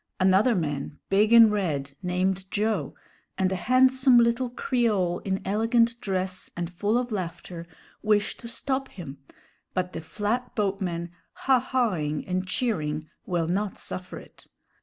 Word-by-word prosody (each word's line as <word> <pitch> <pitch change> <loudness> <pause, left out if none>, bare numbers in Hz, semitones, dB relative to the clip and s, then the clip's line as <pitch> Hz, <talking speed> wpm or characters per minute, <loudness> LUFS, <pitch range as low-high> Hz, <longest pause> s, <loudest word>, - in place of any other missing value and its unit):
Another 190 +6 +4
man, 145 -4 -3
big 210 +3 +4
and 230 -2 +8
red, 150 -9 -1
named 185 +1 -1
Joe, 215 +2 -1 0.4
and 190 0 +1
a - - 0
handsome 260 +4 +4
little 235 +1 +3
Creole 215 -8 0
in 190 -1 -3
elegant 230 +3 +2
dress 185 -1 -3
and 175 0 -3
full 205 +6 +1
of 245 -1 -2
laughter, 170 -3 -5 0.3
wish 210 -1 +2
to 235 - -10
stop 265 +2 -2
him, 140 -7 -9 0.6
but 180 0 -1
the 165 - -5
flatboatmen, 200 -4 -2 0.3
ha 265 -2 +5
ha 245 -4 0
ing 150 0 -2
and 185 0 -2
cheering, 155 -8 -2 0.2
will 170 -2 0
not 195 +3 -1
suffer 185 0 -6
it. - - -15
195 Hz, 140 wpm, -26 LUFS, 180-235 Hz, 0.6 s, and